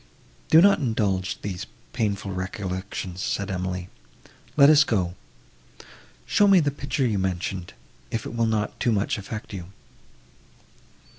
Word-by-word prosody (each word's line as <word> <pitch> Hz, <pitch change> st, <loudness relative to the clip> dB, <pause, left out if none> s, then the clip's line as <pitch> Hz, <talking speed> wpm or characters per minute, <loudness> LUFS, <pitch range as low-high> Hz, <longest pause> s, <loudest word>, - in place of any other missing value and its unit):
"Do 160 Hz, +2 st, +8 dB
not 200 Hz, 0 st, +6 dB
indulge 105 Hz, -, 0 dB
these 95 Hz, 0 st, -4 dB, 0.3 s
painful 100 Hz, -4 st, -1 dB
recollections," 95 Hz, 0 st, -4 dB
said 100 Hz, -1 st, -2 dB
Emily, 90 Hz, -1 st, -3 dB, 0.7 s
"let 140 Hz, -1 st, +8 dB
us 150 Hz, 0 st, +7 dB
go. 95 Hz, -9 st, 0 dB, 1.1 s
Show 205 Hz, -, +4 dB
me 195 Hz, -2 st, +7 dB
the 145 Hz, -3 st, +1 dB
picture 140 Hz, -1 st, -2 dB
you 105 Hz, -5 st, +1 dB
mentioned, 95 Hz, -1 st, -3 dB, 0.4 s
if 115 Hz, -, -3 dB
it -, -, -6 dB
will 115 Hz, -1 st, +2 dB
not 110 Hz, -1 st, -1 dB
too 120 Hz, -, +2 dB
much 105 Hz, +1 st, 0 dB
affect 110 Hz, +2 st, -7 dB
you." 90 Hz, -3 st, -5 dB
100 Hz, 135 wpm, -25 LUFS, 95-120 Hz, 1.1 s, Do